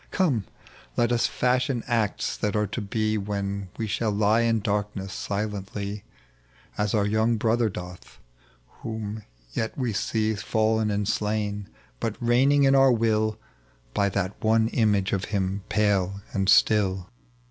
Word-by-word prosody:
Come, 140 Hz, -, +1 dB, 0.5 s
let 120 Hz, 0 st, +2 dB
us. 120 Hz, -1 st, +2 dB
fashion 125 Hz, 0 st, 0 dB
acts 115 Hz, -4 st, 0 dB
that 105 Hz, 0 st, -2 dB
are 105 Hz, 0 st, +2 dB
to 110 Hz, +4 st, -4 dB
be, 110 Hz, +1 st, -1 dB
When 100 Hz, -1 st, -3 dB
we 115 Hz, -, -2 dB
shall 110 Hz, +1 st, -1 dB
lie 105 Hz, +2 st, +3 dB
in 115 Hz, -1 st, +2 dB
darkness 100 Hz, -1 st, -2 dB
silently. 100 Hz, 0 st, -4 dB, 0.7 s
As 105 Hz, +1 st, 0 dB
our 105 Hz, -1 st, +2 dB
young 110 Hz, +2 st, +2 dB
brother 115 Hz, +1 st, +2 dB
doth, 90 Hz, -2 st, -9 dB, 0.6 s
whom 110 Hz, -1 st, -5 dB, 0.3 s
yet 110 Hz, -, -2 dB
we 125 Hz, -5 st, -1 dB
see 110 Hz, +2 st, 0 dB
Fallen 110 Hz, 0 st, +1 dB
and 100 Hz, -1 st, -1 dB
slain, 105 Hz, -1 st, -1 dB, 0.3 s
but 110 Hz, -2 st, -2 dB
reigning 135 Hz, +4 st, +4 dB
in 135 Hz, 0 st, +5 dB
our 135 Hz, -1 st, +6 dB
will 110 Hz, -2 st, +1 dB, 0.6 s
By 100 Hz, 0 st, +2 dB
that 95 Hz, 0 st, -1 dB
one 110 Hz, 0 st, +3 dB
image 105 Hz, -5 st, +1 dB
of 100 Hz, 0 st, 0 dB
him 100 Hz, -1 st, -1 dB
pale 100 Hz, -2 st, +1 dB
and 95 Hz, -1 st, 0 dB
stiil." 95 Hz, -3 st, +4 dB
105 Hz, 145 wpm, -26 LUFS, 100-115 Hz, 0.7 s, our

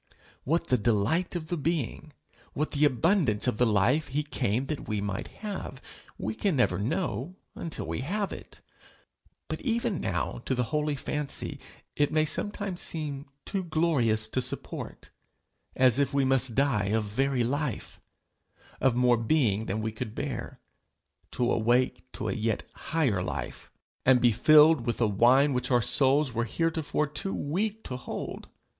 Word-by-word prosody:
What 165 Hz, +5 st, +1 dB
the 125 Hz, -, +3 dB
delight 115 Hz, -, +1 dB
of 155 Hz, -3 st, -4 dB
the 175 Hz, -, -1 dB
being, 155 Hz, -1 st, -2 dB, 0.4 s
what 150 Hz, +2 st, -2 dB
the 150 Hz, 0 st, +3 dB
abundance 145 Hz, -, +2 dB
of 125 Hz, -4 st, 0 dB
the 125 Hz, -, +4 dB
life 115 Hz, +9 st, +2 dB
he 150 Hz, +3 st, -1 dB
came 125 Hz, -4 st, -1 dB
that 150 Hz, +1 st, -5 dB
we 105 Hz, -1 st, -1 dB
might 100 Hz, -1 st, -3 dB
have, 200 Hz, -10 st, -7 dB, 0.4 s
we 110 Hz, +3 st, -3 dB
can 190 Hz, -, 0 dB
never 105 Hz, -8 st, +2 dB
know 160 Hz, -, -2 dB, 0.2 s
until 165 Hz, -, -5 dB
we 80 Hz, +3 st, -3 dB
have 200 Hz, -, -2 dB
it. -, -, -11 dB, 0.9 s
But -, -, -4 dB
even 235 Hz, -, 0 dB
now 90 Hz, +5 st, -2 dB
to 130 Hz, -, 0 dB
the 125 Hz, -, +1 dB
holy 150 Hz, -1 st, +1 dB
fancy 150 Hz, 0 st, -2 dB, 0.4 s
it 145 Hz, -1 st, +2 dB
may 155 Hz, 0 st, +3 dB
sometimes 195 Hz, +2 st, -3 dB
seem 145 Hz, -4 st, -4 dB, 0.2 s
too 195 Hz, -2 st, -2 dB
glorious 155 Hz, -10 st, +1 dB
to 130 Hz, -, 0 dB
support 125 Hz, -, -6 dB, 0.6 s
as 130 Hz, 0 st, +4 dB
if 140 Hz, 0 st, +1 dB
we 140 Hz, -1 st, +3 dB
must 130 Hz, -3 st, +1 dB
die 135 Hz, -7 st, +2 dB
of 110 Hz, +2 st, +1 dB
very 125 Hz, +4 st, 0 dB
life 140 Hz, +1 st, -3 dB, 0.8 s
of 130 Hz, -3 st, +2 dB
more 125 Hz, -1 st, +4 dB
being 115 Hz, -3 st, +1 dB
than 105 Hz, +3 st, -2 dB
we 110 Hz, -, -1 dB
could 110 Hz, 0 st, -6 dB
bear -, -, -5 dB, 0.7 s
to 120 Hz, 0 st, +1 dB
awake 125 Hz, +3 st, +1 dB
to -, -, -4 dB
a -, -, 0 dB
yet 115 Hz, -2 st, -1 dB
higher 140 Hz, -, 0 dB
life, -, -, -5 dB, 0.3 s
and 130 Hz, -1 st, +5 dB
be 120 Hz, -1 st, +4 dB
filled 155 Hz, +3 st, +6 dB
with 120 Hz, -, -1 dB
a 120 Hz, -, +3 dB
wine 125 Hz, +7 st, +4 dB
which 125 Hz, -, -1 dB
our 125 Hz, -2 st, +4 dB
souls 135 Hz, +3 st, +3 dB
were 115 Hz, 0 st, 0 dB
heretofore 160 Hz, +3 st, 0 dB
too 150 Hz, +7 st, -3 dB
weak 205 Hz, +9 st, -2 dB
to 125 Hz, -, -5 dB
hold! 125 Hz, -, -6 dB
135 Hz, 165 wpm, -28 LUFS, 115-155 Hz, 0.9 s, filled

